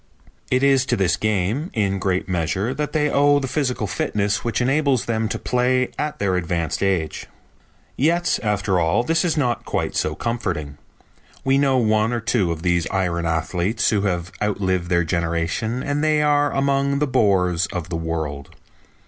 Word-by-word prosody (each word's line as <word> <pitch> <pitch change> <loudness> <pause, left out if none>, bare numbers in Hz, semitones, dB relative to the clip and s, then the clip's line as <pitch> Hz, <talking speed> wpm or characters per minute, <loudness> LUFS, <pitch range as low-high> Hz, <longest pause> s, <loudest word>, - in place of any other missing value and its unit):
It 130 +1 +2
is 135 -2 +4
to - - +2
this 95 -3 +2
game, 110 - -1
in 100 -3 0
great 95 -1 -1
measure, 95 +6 -1
that 150 +1 -3
they 150 -2 +1
owe 145 0 +4
the 135 -2 -2
physical 130 -5 -1
fitness 100 +2 -1
which 115 -2 -1
enables 135 0 +1
them 110 -1 -1
to - - -2
play 125 0 +1
at 150 0 -2
their 100 -2 0
advanced 85 -2 -2
age." 95 -5 -1 0.7
Yet 170 +5 +1
after 105 -3 0
all 85 +8 +2
this 165 +5 +1
is 170 -3 0
not 125 -5 0
quite - - -2
so 75 - 0
comforting. 85 -12 -3 0.6
We 135 +1 +3
know 135 -2 +3
one 110 -1 +2
or 120 - 0
two 105 -5 0
of 80 0 -5
these 85 -2 +1
iron 85 -3 -1
athletes 85 +6 0
who 105 -3 +1
have 90 -2 -2
outlived 95 -4 -1
their 85 -1 +2
generation 85 +8 -1
and 145 +1 -1
they 155 -1 +3
are 145 -1 +2
among 140 0 +1
the 150 - +1
bores 95 - +2
of 90 -2 -5
the 85 - -3
world. 80 -4 -4
105 Hz, 175 wpm, -22 LUFS, 90-135 Hz, 0.7 s, is